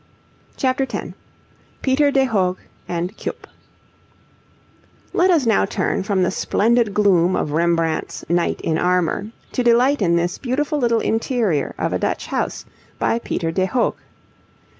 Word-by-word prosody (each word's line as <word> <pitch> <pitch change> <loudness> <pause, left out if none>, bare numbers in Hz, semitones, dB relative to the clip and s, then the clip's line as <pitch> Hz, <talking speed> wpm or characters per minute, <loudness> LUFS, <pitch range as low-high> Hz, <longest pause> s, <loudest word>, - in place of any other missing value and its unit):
CHAPTER 265 0 0
X - - -4 0.7
PETER 285 +2 +3
DE 270 -1 +3
HOOGH 190 -7 0 0.3
AND 175 +4 -3
CUYP - - -6 1.7
Let 365 +2 +3
us 325 -8 +3
now 225 -2 +3
turn 195 - -1
from 195 -1 0
the 180 - +1
splendid 230 +3 +1
gloom 185 -4 +3
of 150 - -1
Rembrandt's 165 0 0
'Knight 170 +1 0
in 160 -1 0
Armour,' 180 +2 +1 0.2
to - - -1
delight 245 +4 +3
in 170 -3 +3
this 175 +1 -1
beautiful 290 +4 -1
little 235 -3 +2
interior 225 - 0
of - - -1
a - - 0
Dutch - - -2
house - - -3 0.3
by 230 - +1
Peter 165 -7 -2
de 185 +2 0
Hoogh. 245 +3 +1
210 Hz, 140 wpm, -20 LUFS, 175-255 Hz, 1.7 s, PETER